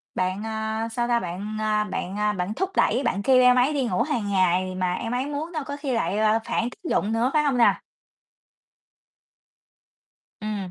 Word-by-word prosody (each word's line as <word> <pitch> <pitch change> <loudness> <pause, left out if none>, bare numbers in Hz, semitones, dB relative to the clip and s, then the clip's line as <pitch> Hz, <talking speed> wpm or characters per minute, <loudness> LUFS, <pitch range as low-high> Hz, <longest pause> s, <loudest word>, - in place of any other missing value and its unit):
bạn, 185 +3 -1
ờ, 220 0 -3
sao 240 +1 -1
ta, 240 -1 +2
bạn, 200 +3 -5
à, 215 -1 +1
bạn, 195 -1 -4
à, 210 0 +1
bạn 190 +2 -3
thúc 375 +8 -2
đẩy, 245 +5 +2
bạn 200 - 0
kêu 255 +1 +5
em 250 0 +6
ấy 255 +4 +3
đi 275 -3 0
ngủ 185 -6 0
hàng 240 -9 -1
ngày 185 -1 +1
mà 185 -1 0
em 230 +5 -4
ấy 250 +2 -1
muốn 300 +4 -4
đâu, 310 -3 -3
có 285 +1 -6
khi 280 -3 -3
lại 195 -4 0
là 215 +1 +3
phản 235 - -1
tác 330 +6 -9
dụng 210 - +1
nữa, 235 +3 +2
phải 300 -1 +3
hông 275 -3 +1
nè? 235 - +4 2.6
Ừm. 205 -4 -4
220 Hz, 200 wpm, -24 LUFS, 200-255 Hz, 2.6 s, em